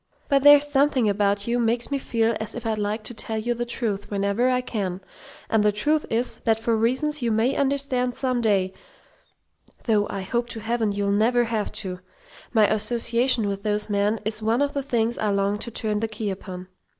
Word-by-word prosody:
But 275 Hz, -2 st, +4 dB
there's 290 Hz, +1 st, +7 dB
something 275 Hz, -4 st, +2 dB
about 200 Hz, 0 st, +1 dB
you 240 Hz, +1 st, 0 dB
makes 235 Hz, +2 st, 0 dB
me 280 Hz, -, 0 dB
feel 230 Hz, -3 st, 0 dB
as 220 Hz, 0 st, -5 dB
if 240 Hz, -, -7 dB
I'd 220 Hz, -1 st, -1 dB
like 210 Hz, +1 st, -2 dB
to 240 Hz, -, -5 dB
tell 220 Hz, 0 st, -4 dB
you 235 Hz, +2 st, -1 dB
the 240 Hz, 0 st, -4 dB
truth 210 Hz, -4 st, -3 dB
whenever 200 Hz, +5 st, +1 dB
I 250 Hz, 0 st, +2 dB
can: 200 Hz, -7 st, -3 dB, 0.5 s
and 220 Hz, -2 st, +2 dB
the 210 Hz, -, +4 dB
truth 295 Hz, +9 st, 0 dB
is, 235 Hz, +2 st, -1 dB
that 225 Hz, -1 st, +1 dB
for 230 Hz, 0 st, +1 dB
reasons 260 Hz, +7 st, 0 dB
you 235 Hz, -1 st, 0 dB
may 225 Hz, +5 st, +1 dB
understand 270 Hz, -3 st, 0 dB
some 255 Hz, -2 st, -1 dB
day 195 Hz, -4 st, +1 dB, 1.1 s
though 210 Hz, -3 st, +2 dB
I 195 Hz, -, -4 dB
hope 235 Hz, +5 st, -2 dB
to 230 Hz, -, -5 dB
Heaven 225 Hz, -1 st, -1 dB
you'll 200 Hz, 0 st, -1 dB
never 235 Hz, +4 st, +3 dB
have 225 Hz, -2 st, -2 dB
to! 180 Hz, -1 st, -5 dB, 0.5 s
my 220 Hz, -3 st, +5 dB
association 230 Hz, +2 st, +2 dB
with 200 Hz, 0 st, -3 dB
those 210 Hz, 0 st, -1 dB
men 205 Hz, +2 st, +1 dB
is 215 Hz, 0 st, -2 dB
one 225 Hz, +5 st, +2 dB
of 285 Hz, -, -2 dB
the 280 Hz, -, -1 dB
things 235 Hz, -3 st, -1 dB
I 215 Hz, -, 0 dB
long 200 Hz, +1 st, 0 dB
to 235 Hz, -, -4 dB
turn 215 Hz, -2 st, -2 dB
the 225 Hz, -, -1 dB
key 215 Hz, -1 st, -4 dB
upon. 185 Hz, -1 st, -8 dB
225 Hz, 205 wpm, -24 LUFS, 210-245 Hz, 1.1 s, there's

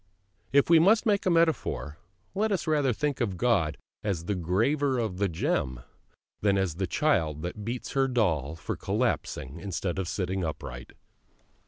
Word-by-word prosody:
If 140 Hz, +1 st, +4 dB
we 165 Hz, -1 st, +7 dB
must 210 Hz, +7 st, +5 dB
take 205 Hz, -4 st, +1 dB
a -, -, +5 dB
metaphor, 165 Hz, -, +1 dB, 0.3 s
let 210 Hz, +3 st, 0 dB
us 195 Hz, -, 0 dB
rather 150 Hz, -5 st, +2 dB
think 140 Hz, +3 st, -1 dB
of 100 Hz, -6 st, -1 dB
God 95 Hz, -9 st, +2 dB, 0.3 s
as 90 Hz, -6 st, -2 dB
the 100 Hz, -, 0 dB
graver 115 Hz, -, +1 dB
of 110 Hz, -6 st, -2 dB
the 100 Hz, -1 st, +2 dB
gem 65 Hz, -6 st, -1 dB, 0.6 s
than 100 Hz, -1 st, +3 dB
as 95 Hz, -4 st, -1 dB
the 95 Hz, -1 st, -1 dB
child 85 Hz, -, +1 dB
that 90 Hz, +4 st, -5 dB
beats 120 Hz, +3 st, -4 dB
her 135 Hz, -1 st, +2 dB
doll 80 Hz, -, 0 dB
for 80 Hz, -, -4 dB
collapsing 70 Hz, +6 st, -2 dB
instead 95 Hz, -1 st, -3 dB
of 95 Hz, -, -2 dB
sitting 95 Hz, +1 st, -2 dB
upright. 60 Hz, -6 st, -6 dB
100 Hz, 165 wpm, -28 LUFS, 85-140 Hz, 0.6 s, we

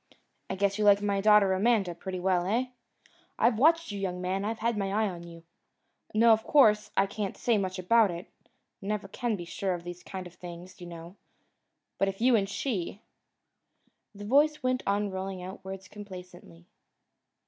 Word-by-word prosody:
I -, -, -2 dB
guess 200 Hz, +1 st, 0 dB
you -, -, +2 dB
like 205 Hz, -1 st, +6 dB
my 200 Hz, -1 st, 0 dB
daughter 210 Hz, -2 st, +5 dB
Amanda 200 Hz, -2 st, +2 dB
pretty 185 Hz, +2 st, -6 dB
well. 180 Hz, -1 st, +1 dB
Eh? 240 Hz, +5 st, 0 dB, 0.7 s
I've 230 Hz, -2 st, +3 dB
watched 330 Hz, 0 st, +4 dB
you, 200 Hz, -, -5 dB
young 180 Hz, -2 st, -3 dB
man. 185 Hz, +2 st, -2 dB
I've 220 Hz, +2 st, -2 dB
had 230 Hz, +1 st, 0 dB
my 200 Hz, -2 st, -1 dB
eye 215 Hz, +2 st, +1 dB
on 175 Hz, -3 st, -6 dB
you! 165 Hz, -1 st, -12 dB, 0.7 s
Now, 230 Hz, +1 st, +6 dB
of 220 Hz, 0 st, 0 dB
course, 215 Hz, -8 st, +4 dB
I -, -, +5 dB
can't 200 Hz, 0 st, -4 dB
say 230 Hz, -3 st, +2 dB
much 185 Hz, -1 st, -3 dB
about 210 Hz, +4 st, +4 dB
it 175 Hz, +1 st, -6 dB, 0.5 s
never 205 Hz, 0 st, -3 dB
can 235 Hz, +3 st, -2 dB
be 175 Hz, -3 st, -7 dB
sure 185 Hz, +2 st, -2 dB
of 170 Hz, -, -8 dB
these 175 Hz, 0 st, -8 dB
kind 185 Hz, -1 st, -7 dB
of 175 Hz, -, -11 dB
things, 175 Hz, +1 st, -11 dB
you 175 Hz, -, -8 dB
know 170 Hz, +2 st, -10 dB, 0.8 s
but 195 Hz, -, +3 dB
if 195 Hz, 0 st, -4 dB
you 245 Hz, +1 st, +4 dB
and 195 Hz, -3 st, +1 dB
she 200 Hz, -4 st, -3 dB, 0.5 s
" -, -, -44 dB
The 205 Hz, +1 st, -8 dB
voice 290 Hz, +5 st, +3 dB
went 255 Hz, 0 st, +1 dB
on 200 Hz, 0 st, +1 dB
rolling 190 Hz, -1 st, -5 dB
out 190 Hz, +1 st, -9 dB
words 190 Hz, 0 st, -8 dB
complacently. 180 Hz, -, -11 dB
195 Hz, 190 wpm, -29 LUFS, 185-215 Hz, 0.8 s, like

